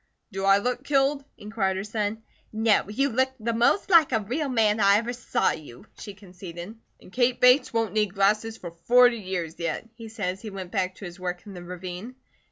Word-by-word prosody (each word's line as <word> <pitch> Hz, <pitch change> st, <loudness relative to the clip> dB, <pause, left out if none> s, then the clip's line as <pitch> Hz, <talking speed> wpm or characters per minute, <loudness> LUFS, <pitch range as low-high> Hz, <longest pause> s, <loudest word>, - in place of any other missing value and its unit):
"Do 195 Hz, 0 st, -3 dB
I 195 Hz, 0 st, +6 dB
look 250 Hz, +4 st, -2 dB
killed?" 280 Hz, 0 st, +1 dB
inquired 205 Hz, -3 st, -2 dB
her 190 Hz, -, -3 dB
son. 215 Hz, +1 st, -3 dB, 0.3 s
"No. 220 Hz, -2 st, +2 dB
You 275 Hz, +7 st, +1 dB
look 260 Hz, +2 st, +1 dB
the 230 Hz, +1 st, -2 dB
most 240 Hz, -, +2 dB
like 330 Hz, -5 st, +6 dB
a 225 Hz, -, +2 dB
real 265 Hz, +8 st, -3 dB
man 220 Hz, -3 st, +2 dB
I 200 Hz, 0 st, +5 dB
ever 235 Hz, +3 st, -2 dB
saw 245 Hz, -, 0 dB
you," 150 Hz, -, -10 dB
she 205 Hz, -2 st, -9 dB
conceded. 180 Hz, 0 st, -10 dB, 0.2 s
"And 185 Hz, -, -17 dB
Kate 250 Hz, 0 st, +1 dB
Bates 250 Hz, +2 st, +5 dB
won't 225 Hz, -2 st, -1 dB
need 210 Hz, -2 st, 0 dB
glasses 215 Hz, +3 st, +1 dB
for 175 Hz, -, -8 dB
forty 245 Hz, +7 st, +4 dB
years 180 Hz, -5 st, -5 dB
yet," 170 Hz, +6 st, -3 dB
he 225 Hz, -1 st, -10 dB
said 210 Hz, -5 st, -3 dB
as 185 Hz, +1 st, -6 dB
he 220 Hz, -, -7 dB
went 190 Hz, -3 st, -8 dB
back 190 Hz, -2 st, -1 dB
to 195 Hz, -, -10 dB
his 175 Hz, +1 st, -9 dB
work 180 Hz, +1 st, -5 dB
in 205 Hz, -, -10 dB
the 180 Hz, -, -9 dB
ravine. 180 Hz, +6 st, -8 dB
210 Hz, 210 wpm, -25 LUFS, 190-235 Hz, 0.3 s, I